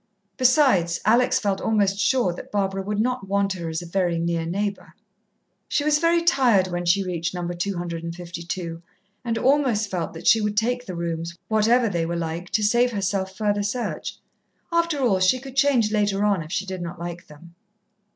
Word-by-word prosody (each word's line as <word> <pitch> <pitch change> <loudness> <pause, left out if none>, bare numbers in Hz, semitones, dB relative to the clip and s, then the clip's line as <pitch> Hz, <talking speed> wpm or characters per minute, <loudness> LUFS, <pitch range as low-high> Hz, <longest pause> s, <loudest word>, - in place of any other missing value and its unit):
Besides, 255 - +3
Alex 240 +4 +4
felt 200 -5 -1
almost 200 -3 +1
sure 210 -3 +2
that - - -10
Barbara 195 -1 -1
would 205 +2 -3
not 235 -3 -1
want 200 0 +1
her 170 -3 -5
as 160 +2 -3
a - - -9
very 175 -1 0
near 165 0 -1
neighbour. 200 +3 -3 0.7
She 290 - 0
was 300 0 +3
very 335 +1 +2
tired 250 - +4
when 175 0 -3
she 195 +3 +3
reached 175 -1 -3
No. 175 -1 -3
252, 170 -1 -5 0.4
and 230 -2 -1
almost 250 -6 +2
felt 175 -4 -3
that 165 - -10
she 225 - +5
would 210 0 -2
take 245 +3 0
the 185 - -5
rooms, 170 0 -4
whatever 225 +3 +3
they 170 -5 -1
were 170 - -2
like, 170 +2 -4
to 220 - 0
save 240 +4 +3
herself 195 -2 -2
further 205 -1 0
search. 210 +4 -3 0.5
After 335 -3 +1
all, 215 -7 +2
she 185 +7 +4
could 265 0 -10
change 270 -6 +3
later 205 -1 +1
on, 200 -4 +2
if 155 0 -9
she 195 - -1
did 190 -2 -5
not 175 +1 -6
like 170 0 -7
them. 165 +3 -15
195 Hz, 185 wpm, -24 LUFS, 175-230 Hz, 0.7 s, she